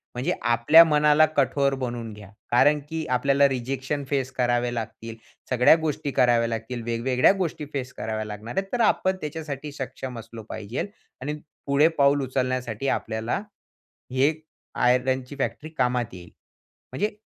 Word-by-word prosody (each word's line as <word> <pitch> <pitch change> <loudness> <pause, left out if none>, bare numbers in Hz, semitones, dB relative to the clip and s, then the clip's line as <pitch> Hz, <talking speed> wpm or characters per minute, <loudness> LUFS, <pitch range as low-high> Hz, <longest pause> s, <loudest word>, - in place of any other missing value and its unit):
म्हणजे 135 +9 0
आपल्या 120 +8 +7
मनाला 150 0 +5
कठोर 140 0 +2
बनवून 120 -2 -4
घ्या, 105 -2 -12 0.2
कारण 145 +5 +5
की 160 -1 -3
आपल्याला 140 +2 +4
रिजेक्शन 135 +3 -3
फेस 135 -2 -1
करावे 120 -1 0
लागतील, 115 0 -6 0.3
सगळ्या 125 +4 +6
गोष्टी 150 -2 -2
कराव्या 120 -3 +3
लागतील, 115 +2 -4
वेगवेगळ्या 120 +4 +3
गोष्टी 165 -5 -2
फेस 130 -2 -4
कराव्या 110 -1 -4
लागणार 105 +3 -8
आहेत, 195 0 0
तर 245 - +1
आपण 190 -3 +2
त्याच्यासाठी 150 -1 -5
सक्षम 130 -3 -6
असलो 115 0 -10
पाहिजेल 110 - -4 0.3
आणि 145 +3 -3 0.3
पुढे 140 +3 +5
पाऊल 140 0 +4
उचलण्यासाठी 130 -1 -2
आपल्याला 110 - -3 0.7
ही 130 0 0
एक 155 0 -3 0.3
आयरनची 130 +2 +1
फॅक्टरी 135 +3 -3
कामात 125 -3 0
येईल. 90 -2 -11 0.6
म्हणजे, 205 +10 -2
130 Hz, 140 wpm, -25 LUFS, 120-145 Hz, 0.7 s, आपल्या